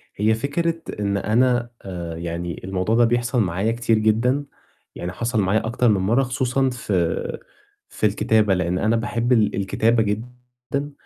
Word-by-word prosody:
هي 110 +2 +2
فكرة 165 +7 -1 0.2
إن 100 -1 0
أنا 120 +3 +2
آآ 85 -3 -6
يعني 85 0 -4
الموضوع 95 +3 -1
ده 120 0 +5
بيحصل 120 +1 +1
معايا 95 +3 0
كتير 115 -1 +1
جدًا، 115 +6 +2 0.5
يعني 90 - -4
حصل 115 +4 -1
معايا 100 +4 +1
أكتر 120 +1 +1
من 100 -3 +2
مَرّة 115 +8 +2
خصوصًا 130 +1 0
في 95 -9 -1 0.5
في - - -2
الكتابة، 105 0 +2
لإن 90 -1 0
أنا 110 +4 +2
باحب 115 +1 -1
ال 110 -3 +2
الكتابة 110 +4 +2
جدًا، 125 +6 -5
110 Hz, 150 wpm, -22 LUFS, 95-125 Hz, 0.5 s, ده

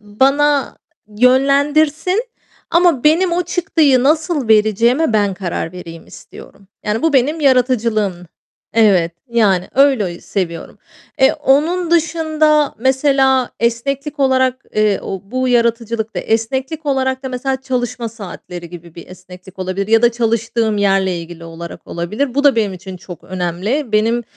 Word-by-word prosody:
bana 275 +7 +1 0.3
yönlendirsin 285 - +2 0.5
ama 340 -6 +3
benim 340 +4 +3
o 350 +1 +1
çıktıyı 320 -7 +2
nasıl 305 -2 0
vereceğime 225 +6 +3
ben 205 -3 +1
karar 180 -3 -4
vereyim 165 -2 -10
istiyorum. 195 -1 -15 0.2
Yani, 210 +2 -2
bu 325 - +2
benim 285 +4 +1
yaratıcılığım. 235 -7 +1 0.6
Evet, 195 -7 +3 0.2
yani, 200 -6 +1
öyle 255 -10 +2
ü - - -16
seviyorum. 170 -4 -5 0.4
Eee, 265 - +5
onun 315 +5 +1
dışında 315 -3 +1
mesela 265 0 +2
esneklik 275 +5 -2
olarak, 260 -1 +1
eee, 215 -2 +1
o 195 - -5
bu 255 +1 -1
yaratıcılıkta, 230 -2 0
esneklik 265 +7 -2
olarak 265 -1 -1
da 265 - -4
mesela 260 +1 -3
çalışma 245 -3 -3
saatleri 180 -5 -9
gibi 170 -2 -12
bir 170 - -11
esneklik 185 +1 -14
olabilir 185 +1 -3
ya 225 +1 +4
da 240 0 +4
çalıştığım 230 -1 -1
yerle 195 -3 +1
ilgili 170 0 -10
olarak 165 +1 -10
olabilir. 215 +10 -3
Bu 285 +1 0
da 280 -4 +5
benim 210 -3 0
için 185 0 -9
çok 175 0 -12
önemli. 185 - -3
Benim 225 +3 +1
240 Hz, 135 wpm, -17 LUFS, 200-280 Hz, 0.6 s, Eee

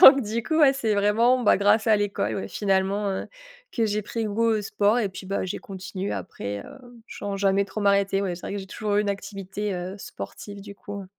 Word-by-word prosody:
Donc, 270 -5 +10
du 220 +2 -2
coup, 315 +3 0
ouais, 280 -3 +7
c'est 225 -6 0
vraiment, 225 +5 +4
bah, - - +6
grâce 205 +3 +3
à 220 - +6
l'école, 195 - -1
ouais, 95 -1 -4
finalement, 195 0 +1
heu, 190 - -3 0.4
que 230 -2 +1
j'ai 210 0 -1
pris 225 +2 -3
goût 220 +2 +1
au 220 -2 +2
sport. 210 +2 +2
Et 210 -4 +1
puis, 190 0 -9
bah, 195 0 -2
j'ai 180 - -3
continué 190 0 -5
après, 100 - -5
heu 280 - -12 0.3
sans 200 -1 -4
jamais 195 0 +3
trop 215 +2 -6
m'arrêter. 200 -1 +3
Ouais, 185 -3 -1
c'est 175 - -10
vrai - - -5
que - - -2
j'ai 190 - -7
toujours 205 +1 -2
eu 210 - +4
une 205 - -2
activité, 200 0 -4
heu, 180 +1 -4
sportive, 205 -3 -8
du 200 0 -10
coup. 200 -1 -7
205 Hz, 230 wpm, -25 LUFS, 195-215 Hz, 0.4 s, Donc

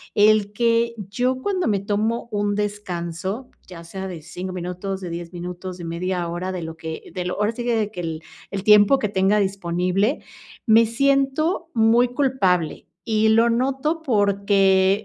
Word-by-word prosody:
el 210 -1 +4
que 230 +1 +1
yo 245 +6 -2
cuando 375 0 -1
me 205 -2 +1
tomo 215 +4 -1
un 205 0 0
descanso, 200 +1 -4 0.2
ya 170 -2 -10
sea 190 +3 -6
de 170 -3 -7
5 180 +4 -7
minutos, 185 +2 -4
de 180 -2 -6
10 170 0 -6
minutos, 180 +1 -7
de 175 - -8
media 175 +1 -2
hora 175 +2 -3
de 185 -2 -4
lo 160 0 -6
que 160 0 -7
de 180 - -3
lo 180 - -3
ahora 210 +2 +1
sí 240 - -5
que 240 0 0
de 215 -2 0
que 180 - -6
el 165 -2 -4 0.3
el 195 -1 -4
tiempo 210 +5 +6
que 210 - 0
tenga 195 +1 +2
disponible, 195 - 0 0.5
me 225 0 +6
siento 275 +8 +1
muy 230 +2 +4
culpable, 195 - +1 0.2
y 220 -1 +2
lo 230 +2 +4
noto 270 +7 0
porque, 200 -5 +3
205 Hz, 170 wpm, -22 LUFS, 180-230 Hz, 0.5 s, tiempo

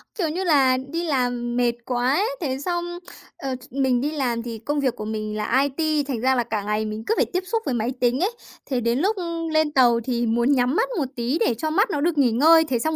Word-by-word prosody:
Kiểu, 345 -6 -1
như 355 +5 -2
là 275 -7 +4
đi 280 +6 -4
làm 245 -5 -1
mệt 245 -1 +3
quá 250 +1 +1
ấy, 410 +7 +1
thế 265 -4 -2
xong, 345 +2 -3 0.4
ờ, 270 -1 -3
ch 255 +2 -13
mình 260 -2 +1
đi 290 +3 -1
làm 250 -6 -1
thì 230 -2 -6
công 290 +6 -2
việc 265 -4 0
của 215 - -6
mình 215 0 -4
là 250 +5 +2 0.2
IT, 310 -2 +1
thành 260 -5 -2
ra 260 +1 +3
là 245 - +1
cả 220 -3 -3
ngày 210 +1 -1
mình 215 +1 -5
cứ - - +3
phải - - +3
tiếp 365 0 -3
xúc 450 +4 -1
với 265 - -1
máy 235 +1 -1
tính 245 +1 +2
ấy, 380 +7 +1 0.3
thế 255 -3 -1
đến 235 +2 +1
lúc, 400 +7 +1
ưm, 335 -2 -3
lên 315 -1 +2
tàu 245 -4 +4
thì 240 -1 -1
muốn 235 +3 +2
nhắm 255 0 +2
mắt 470 +5 +1
một 300 - 0
tí 245 +6 -1
để 245 - +2
cho 310 +7 -2
mắt 400 +9 +2
nó 290 - -1
được 330 0 0
nghỉ 265 -4 +4
ngơi, 320 +7 +6
thế 265 -7 -1
xong 315 +6 0
265 Hz, 265 wpm, -23 LUFS, 240-315 Hz, 0.4 s, ngơi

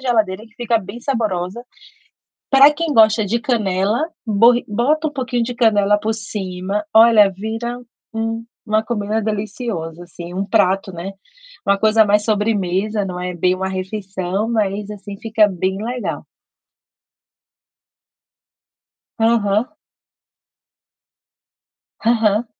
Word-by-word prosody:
geladeira 220 -5 0
que 215 - -25
fica 235 -1 +1
bem 200 +4 -9
saborosa. 220 -6 -2 0.9
Para 275 +2 +8
quem 325 0 -2
gosta 220 -2 +5
de 230 +4 0
canela, 215 +2 0 0.2
borri 230 +3 +4
bota 280 +9 +1
um 295 - -4
pouquinho 250 -2 -2
de 245 +1 -4
canela 210 -3 +3
por 220 +1 -1
cima, 200 -2 -4
olha, 220 -3 +7
vira 225 +5 -5 0.3
um 225 0 -2 0.2
uma 215 +1 +2
comida 215 -1 -2
deliciosa 205 -6 -4
assim, 175 0 -10
um 190 - -1
prato, 195 -2 +1
né, 175 +3 -6 0.6
uma 200 0 +3
coisa 220 +1 +4
mais 210 0 +2
sobremesa, 210 -1 0
não 180 -1 -5
é 180 0 -4
bem 180 +2 +1
uma 190 +1 -3
refeição, 190 +1 -3
mas 210 -2 -1
assim 205 -1 -8
fica 215 -1 +3
bem 190 +2 -2
legal. 245 +2 -4 2.9
Aham. 225 +3 +2 2.3
Aham. 225 -1 +2
215 Hz, 115 wpm, -19 LUFS, 195-230 Hz, 2.9 s, Para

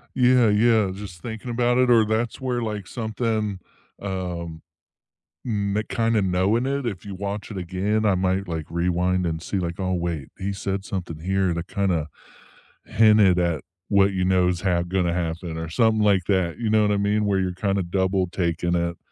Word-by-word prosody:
Yeah, 125 -2 +5
yeah. 110 -1 +3
Just 95 -4 -9
thinking 115 +3 -6
about 120 +1 +2
it 125 -1 +3
or 115 -2 +6
that's 110 +2 -1
where, 125 -2 -1
like, 105 -4 -4
something, 110 -3 -2 0.4
um, 90 -4 -4 0.9
mm, 105 -1 -1
kinda, 115 -1 +1
knowing 95 +6 +1
it. 140 0 -1
If 100 -6 -4
you 100 -2 -6
watch 100 +3 -5
it 100 - -6
again, 95 +4 -1
I 100 -3 +3
might, 95 +1 0
like, 80 -3 -4
rewind 90 +1 0
and 80 -1 -2
see, 100 - -3
like, 85 0 -4
oh, 95 -1 -1
wait, 85 -5 -3
he 100 +1 -3
said 95 0 -3
something 90 -6 -5
here 95 +1 0
to 85 0 -3
kinda 90 -5 -1 0.8
hinted 105 -5 +5
at 85 -4 0 0.2
what 100 -1 +3
you 95 -1 0
know 90 -1 +3
is 90 -1 -1
ha 90 -3 +1
gonna 90 -1 0
happen 85 -1 -3
or 80 0 -5
something 110 +4 +2
like 100 -4 +3
that, 95 -4 0
you 115 -2 -1
know 110 0 +4
what 105 - +2
I 100 - +2
mean? 105 +1 +1
Where 100 -1 +1
you're 90 -1 -1
kinda 100 +1 -1
double 95 +1 0
taking 85 -1 -1
it. 85 0 -1
95 Hz, 190 wpm, -24 LUFS, 90-105 Hz, 0.9 s, or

